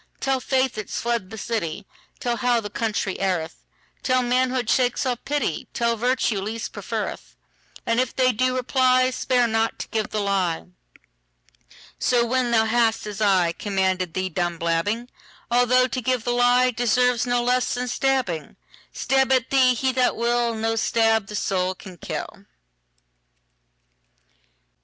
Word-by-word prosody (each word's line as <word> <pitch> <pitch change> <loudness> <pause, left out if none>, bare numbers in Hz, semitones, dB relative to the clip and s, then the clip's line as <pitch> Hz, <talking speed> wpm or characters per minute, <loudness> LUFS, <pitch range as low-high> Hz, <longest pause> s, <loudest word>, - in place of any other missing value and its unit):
Tell 270 -1 0
faith 260 -2 0
it's 210 - -4
fled 235 -5 -2
the 220 - -8
city; 200 -4 -3 0.3
Tell 240 -1 -1
how 245 +1 +2
the 205 -2 -7
country 210 -4 -2
erreth; 180 -5 -2 0.4
Tell, 255 -1 +2
manhood 250 0 +1
shakes 250 +1 +1
off 250 -2 -1
pity; 285 - -2
Tell, 235 0 +1
virtue 240 -3 0
least 225 +3 -5
preferreth:And 230 +1 -5
if 255 -1 -1
they 255 -1 +3
do 255 +2 0
reply, 255 0 +3
Spare 250 -1 +1
not 225 0 0
to - - -6
give 220 -2 -2
the 215 - -2
lie. 195 -5 0 1.3
So 240 -1 +2
when 250 +1 0
thou 225 -1 +3
hast, 225 -1 +1
as 210 -2 -6
ICommanded 190 -2 +1
thee, 185 0 -1
done 175 0 -2
blabbing,—Although 235 +7 0
to 255 - -3
give 250 -1 0
the 245 - -1
lieDeserves 245 0 +2
no 245 0 +1
less 250 +1 +1
than 250 0 -3
stabbing,—Stab 265 - -1
at 260 -1 +2
thee 255 -2 +4
he 260 +3 0
that 255 -1 +1
will, 235 0 0
No 225 +1 -1
stab 225 -2 +2
the 210 - -7
soul 185 -2 -1
can 185 -1 -12
kill. - - -6
235 Hz, 140 wpm, -23 LUFS, 205-255 Hz, 1.3 s, thee